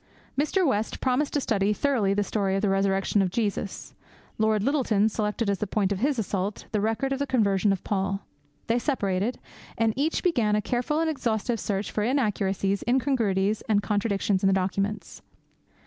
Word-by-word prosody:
Mr. 310 +7 +1
West 220 -6 0
promised 265 +3 +1
to 290 - +2
study 210 -5 +1
thoroughly 230 -5 +1
the 205 +1 +1
story 195 -2 -1
of 195 - -1
the 205 - +3
Resurrection 195 +1 +2
of 190 - +1
Jesus. 205 -1 -3 0.5
Lord 215 -1 +2
Lyttelton 225 -6 +2
selected 210 +1 -2
as 200 -1 0
the 210 - -2
point 200 0 0
of 195 - -1
his 275 +3 +1
assault 200 -2 -2
the 210 -2 0
record 225 +6 0
of 270 - -3
the 280 - -1
conversion 205 -5 +2
of 195 - -2
Paul. 195 0 -2 0.4
They 230 +2 +1
separated; 215 -4 -1 0.4
and 225 -1 +2
each 300 +4 0
began 235 - +2
a - - +2
careful 250 +5 -1
and 330 - +1
exhaustive 235 -5 -1
search 200 0 -2
for 210 - -1
inaccuracies, 200 -5 0
incongruities, 220 -6 +1
and 205 -2 +3
contradictions 205 -2 0
in 195 - +3
the 195 - +4
documents. 195 +2 -2
210 Hz, 180 wpm, -26 LUFS, 195-245 Hz, 0.5 s, the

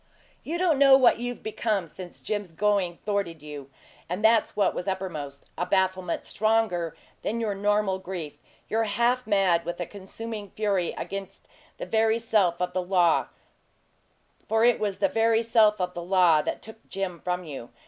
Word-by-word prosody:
You 330 +3 -3
don't 345 -6 +2
know 275 -1 +8
what 250 -3 +4
you've 245 0 -5
become 215 -3 -1
since 175 +2 -10
Jim's 205 -5 -3
going 190 -1 +1
thwarted 195 -7 -2
you 145 -2 -8 0.4
and 185 +5 -1
that's 225 0 +4
what 205 - +2
was 180 - -5
uppermost, 155 -8 -4
a 175 - 0
bafflement 185 -2 0
stronger 215 -7 0 0.2
than 230 +3 -2
your 220 -3 -1
normal 205 -1 +1
grief. 170 -6 -7 0.3
You're 225 +1 +1
half 240 +4 +1
mad 190 -5 +3
with 175 0 -5
a 175 - -2
consuming 205 +2 -7
fury 200 -5 0
against 195 -1 -6 0.3
the - - -5
very 225 0 +2
self 210 -7 +1
of 180 0 -2
the 185 - 0
law 180 -2 +2 1.2
for 225 +1 +3
it 240 -1 +4
was 205 -3 -1
the 295 - +2
very 225 -3 +2
self 220 -2 +4
of 180 -1 -2
the 175 - -5
law 175 -3 +4
that - - -4
took 220 0 -11
Jim 190 -3 -4
from 180 0 -2
you. 140 -7 -8
195 Hz, 170 wpm, -26 LUFS, 180-220 Hz, 1.2 s, know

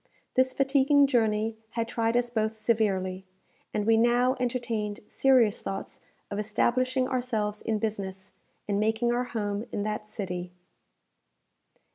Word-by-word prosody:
This 260 0 +3
fatiguing 275 +1 +4
journey 220 -4 +1 0.2
had 230 0 0
tried 230 0 0
us 240 -1 0
both 220 -1 0
severely, 200 -4 0 0.5
and 210 - -1
we 225 0 +5
now 240 +3 +3
entertained 235 -4 -2
serious 250 -6 +3
thoughts 195 - -5 0.3
of 200 - -2
establishing 255 +4 +1
ourselves 225 -5 -1
in 220 -1 -1
business, 195 -3 -4 0.4
and 200 -1 0
making 220 +3 +1
our 245 +1 0
home 205 -3 -3
in 205 - -2
that 215 0 -3
city. 180 -4 -5
225 Hz, 130 wpm, -28 LUFS, 210-245 Hz, 0.5 s, we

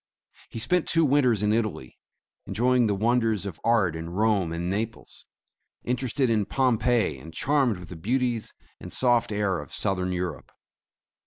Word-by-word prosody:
He - - -8
spent 165 +10 +1
two 165 -1 +3
winters 130 -7 +3
in 105 0 +2
Italy, 110 - -3 0.5
enjoying 125 +1 +2
the 100 - +1
wonders 110 -2 +1
of 95 -5 -6
art 110 -8 +2
in 80 +1 -6
Rome 100 -2 +1
and 85 +1 -3
Naples, 110 +4 -5 0.6
interested 125 +2 0
in 110 -4 +1
Pompeii, 120 - +1
and 80 +5 -11
charmed 130 - +1
with 90 -2 -11
the 90 - -8
beauties 120 +5 -1 0.3
and - - -9
soft 120 -3 +2
air 100 -3 0
of 75 -2 -10
Southern 90 -1 -1
Eu 90 0 -1
rope. 85 -4 -7
110 Hz, 160 wpm, -26 LUFS, 90-125 Hz, 0.6 s, two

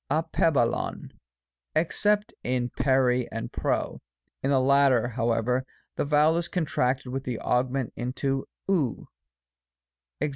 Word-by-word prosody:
ditb^aXkovy 145 -4 0 0.6
except 205 +6 +1
in 125 0 -1
ntQc 125 -2 +2
and 115 0 -5
nqo; - - -1 0.4
in 135 - -1
the 135 -2 +4
latter, 135 -2 +4
however, 120 +1 0 0.3
the - - 0
vowel 150 +3 +3
is 170 0 -1
contracted 135 -7 -1
with 135 0 -3
the 125 -4 -3
augment 125 +1 0
into 135 +2 -2 0.2
ov. 165 -11 0 1.1
Ex. 150 - 0
135 Hz, 115 wpm, -27 LUFS, 125-150 Hz, 1.1 s, the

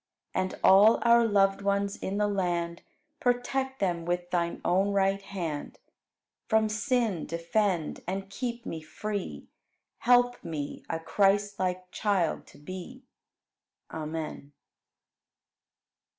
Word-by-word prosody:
And 185 0 -1
all 205 +4 +7
our 235 -1 +6
loved 195 -2 +3
ones 200 0 0
in 195 +1 -4
the 210 - +2
land, 175 -4 -1 0.4
Protect 265 0 0
them 175 -4 0
with 175 +1 -2
Thine 170 -1 0
own 195 +3 +2
right 195 0 +2
hand. 170 -7 -5 0.7
From 220 -1 +3
sin 220 - 0
defend 170 0 0
and 195 +1 -3
keep 235 +3 -4
me 160 - -5
free; 205 +5 -5 0.5
Help 245 0 +3
me 150 -3 -5
a 165 - -1
Christlike 195 0 +1
child 200 -6 0
to - - -16
be. 185 - -8 0.9
Amen. 155 -2 -5
195 Hz, 110 wpm, -29 LUFS, 175-215 Hz, 0.9 s, all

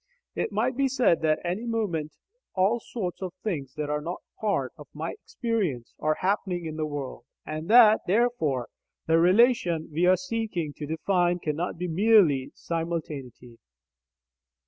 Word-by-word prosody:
It - - -2
might 235 +5 0
be 275 +1 +2
said 255 -10 +2
that 155 -1 +2
at 175 - 0
any 215 +6 -4
moment 185 -10 -2 0.4
all 200 +5 +3
sorts 195 -6 -5
of 185 -2 -5
things 145 -11 -3
that 150 -1 -3
are 150 0 -1
not 170 +4 -5 0.2
part 170 - -1
of 150 - -12
my 160 +2 -3
experience 190 - -3
are 155 0 +1
happening 185 -2 0
in 155 -1 -5
the 155 -1 -2
world, 140 -5 -6 0.2
and 155 +3 -5
that 220 -2 +7
therefore 180 - +1 0.4
the 165 0 +4
relation 180 -3 +3
we 170 +4 +2
are 185 0 +5
seeking 220 - -3
to 150 - -5
define 175 +2 +1
cannot 165 +1 -3
be 180 +1 -3
merely 175 -7 +4
simultaneity. 150 -8 -5
175 Hz, 155 wpm, -27 LUFS, 155-215 Hz, 0.4 s, that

